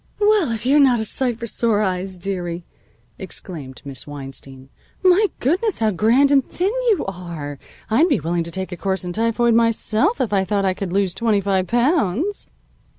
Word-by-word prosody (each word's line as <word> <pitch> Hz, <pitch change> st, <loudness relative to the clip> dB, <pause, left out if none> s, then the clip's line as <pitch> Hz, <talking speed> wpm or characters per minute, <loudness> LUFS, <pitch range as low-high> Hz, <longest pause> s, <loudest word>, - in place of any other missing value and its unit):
"Well, 415 Hz, -, +3 dB
if 225 Hz, 0 st, -4 dB
you're 280 Hz, +3 st, +4 dB
not 260 Hz, -4 st, +5 dB
a 220 Hz, -, -1 dB
sight 245 Hz, +1 st, -1 dB
for 235 Hz, -, -5 dB
sore 220 Hz, -2 st, +1 dB
eyes, 185 Hz, -1 st, -2 dB
dearie," 175 Hz, -2 st, -4 dB, 0.5 s
exclaimed 155 Hz, -8 st, -7 dB
Miss 135 Hz, 0 st, -7 dB
Weinstein. 135 Hz, -2 st, -7 dB, 0.3 s
"My 375 Hz, +3 st, +5 dB
goodness, 370 Hz, -, +1 dB
how 220 Hz, -1 st, +1 dB
grand 235 Hz, +9 st, +3 dB
and 275 Hz, -2 st, +5 dB
thin 375 Hz, -, -2 dB, 0.2 s
you 405 Hz, -8 st, +2 dB
are! 170 Hz, -7 st, -6 dB, 0.3 s
I'd 265 Hz, +10 st, +3 dB
be 290 Hz, -, +2 dB
willing 170 Hz, +2 st, -1 dB
to -, -, -6 dB
take 190 Hz, +2 st, -4 dB
a 180 Hz, -, -5 dB
course 190 Hz, 0 st, -2 dB
in 175 Hz, -, -4 dB
typhoid 230 Hz, +2 st, +2 dB
myself, 230 Hz, -, +2 dB
if 225 Hz, -4 st, -1 dB
I 195 Hz, -1 st, +3 dB
thought 200 Hz, 0 st, 0 dB
I 190 Hz, -, +2 dB
could 185 Hz, -1 st, -5 dB
lose 195 Hz, -1 st, +1 dB
twenty 210 Hz, +1 st, +1 dB
five 190 Hz, -2 st, 0 dB
pounds." 265 Hz, -, +1 dB
210 Hz, 185 wpm, -21 LUFS, 180-255 Hz, 0.5 s, not